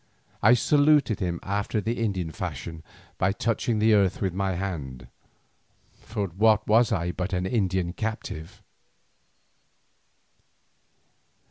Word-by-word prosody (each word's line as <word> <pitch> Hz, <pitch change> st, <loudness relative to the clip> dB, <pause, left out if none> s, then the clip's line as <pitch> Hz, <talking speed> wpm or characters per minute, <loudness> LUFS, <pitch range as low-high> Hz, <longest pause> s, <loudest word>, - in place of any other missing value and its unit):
I 115 Hz, +4 st, +6 dB
saluted 145 Hz, -3 st, +3 dB
him 85 Hz, -2 st, -2 dB
after 100 Hz, +2 st, -1 dB
the 115 Hz, +3 st, -2 dB
Indian 95 Hz, -7 st, -2 dB
fashion 80 Hz, -1 st, -6 dB, 0.4 s
by 95 Hz, -, +2 dB
touching 115 Hz, +2 st, -1 dB
the 110 Hz, +1 st, +4 dB
earth 100 Hz, -2 st, +3 dB
with 95 Hz, -3 st, -1 dB
my 95 Hz, 0 st, -1 dB
hand, 70 Hz, -10 st, -5 dB, 0.9 s
for 105 Hz, -2 st, -3 dB
what 105 Hz, +4 st, +3 dB
was 115 Hz, +3 st, +4 dB
I 90 Hz, -4 st, 0 dB
but 90 Hz, +2 st, -4 dB
an 90 Hz, 0 st, 0 dB
Indian 95 Hz, -4 st, 0 dB
captive? 100 Hz, -3 st, -5 dB
100 Hz, 115 wpm, -26 LUFS, 90-110 Hz, 0.9 s, I